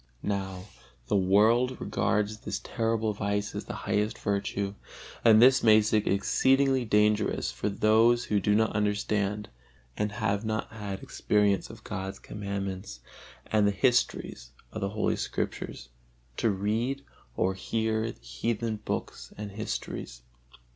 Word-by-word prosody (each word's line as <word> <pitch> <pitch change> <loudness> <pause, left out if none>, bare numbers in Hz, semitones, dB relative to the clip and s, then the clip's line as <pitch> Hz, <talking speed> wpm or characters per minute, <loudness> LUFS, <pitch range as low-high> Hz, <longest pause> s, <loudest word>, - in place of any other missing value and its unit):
Now 95 -2 -3 0.5
the - - +2
world 110 +7 +3
regards 105 +1 0
this - - -4
terrible 115 -2 0
vice 100 0 -2
as - - -5
the - - -6
highest 105 +1 0
virtue, 100 -1 -2 0.5
and 110 -2 +7
this 130 +2 +7
makes 110 -1 +5
it 105 -1 +2
exceedingly 130 +6 +3
dangerous 105 -1 +2
for - - -2
those 110 +4 +4
who 105 - +1
do 105 +2 +2
not 110 0 +2
understand 105 0 0 0.5
and 105 0 -1
have 105 -1 -1
not 110 -1 -2
had 105 -3 -6
experience 105 -2 +1
of - - -12
God's 95 +1 -5
Commandments 95 -9 -5 0.4
and 105 -1 +2
the - - +3
histories 110 - 0 0.2
of 110 - -6
the 100 - 0
Holy 105 +1 0
Scriptures, - - -4 0.5
to 115 - +2
read 110 +8 -1 0.3
or 95 +1 +2
hear 110 +3 -1
the - - -17
heathen 110 - -2
books 105 - -5
and 105 -1 -6
histories. 95 - -5
105 Hz, 135 wpm, -28 LUFS, 100-110 Hz, 0.5 s, and